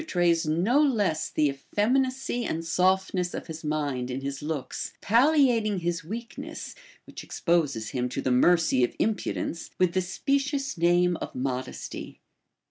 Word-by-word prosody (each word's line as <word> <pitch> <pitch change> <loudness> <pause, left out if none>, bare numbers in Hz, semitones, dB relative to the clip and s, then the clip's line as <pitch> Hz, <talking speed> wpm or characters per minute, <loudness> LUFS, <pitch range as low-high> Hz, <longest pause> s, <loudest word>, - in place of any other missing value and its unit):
f) - - -9
1 - - -24
trays 170 - +2
no 185 - +3
less 210 - +1
the 150 - +2
eiFeminacy 250 - 0
and 165 -6 -3
softness 185 +1 +1
of - - -5
his 160 -1 -8
mind 145 -5 -2
in 130 +1 -3
his 140 0 -4
looks, 150 -2 -4
palHating 235 -4 +3
his 170 -1 -2
weakness, 225 +8 -7 0.3
which - - -9
exposes 145 - 0
him 125 -1 -2
to - - -4
the 130 - 0
mercy 135 0 +4
of 120 - 0
impudence, 205 -5 -2
with 180 -2 +2
the 185 - +2
specious 275 - -1
name 175 0 +3
of - - -7
mod 130 0 -2
esty. - - -8
175 Hz, 155 wpm, -27 LUFS, 150-225 Hz, 0.3 s, mercy